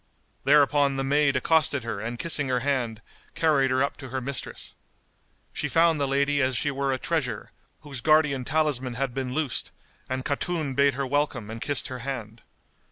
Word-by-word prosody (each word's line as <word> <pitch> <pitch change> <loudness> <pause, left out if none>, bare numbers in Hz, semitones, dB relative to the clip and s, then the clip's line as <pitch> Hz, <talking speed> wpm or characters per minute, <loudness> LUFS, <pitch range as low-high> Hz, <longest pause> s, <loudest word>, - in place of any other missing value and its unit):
Thereupon 145 -1 +4
the 135 - -1
maid 140 0 +2
accosted 140 -1 +2
her 115 -3 -4
and 115 +3 -4
kissing 150 -1 -1
her 125 -1 0
hand, 120 -5 -1 0.3
carried 145 -5 +3
her 130 +1 +2
up 140 - -2
to 135 -2 -9
her 130 +2 -2
mistress. 135 +2 -5 0.8
She - - -2
found 165 -2 +3
the 140 - +1
lady 140 +1 +2
as 130 -1 +1
she 145 +6 0
were 140 0 -1
a 130 - 0
treasure, - - -2 0.3
whose 135 -4 -7
guardian 150 -3 +3
talisman 135 -4 0
had 135 0 -2
been 130 -1 -3
loosed; 155 -5 -1 0.4
and 130 0 -3
Khatun 150 0 -1
bade 140 0 +3
her 140 0 -1
welcome 130 -5 -1
and 115 0 -7
kissed 145 -2 0
her 130 -1 -6
hand. 115 -4 -6
135 Hz, 180 wpm, -26 LUFS, 130-145 Hz, 0.8 s, Thereupon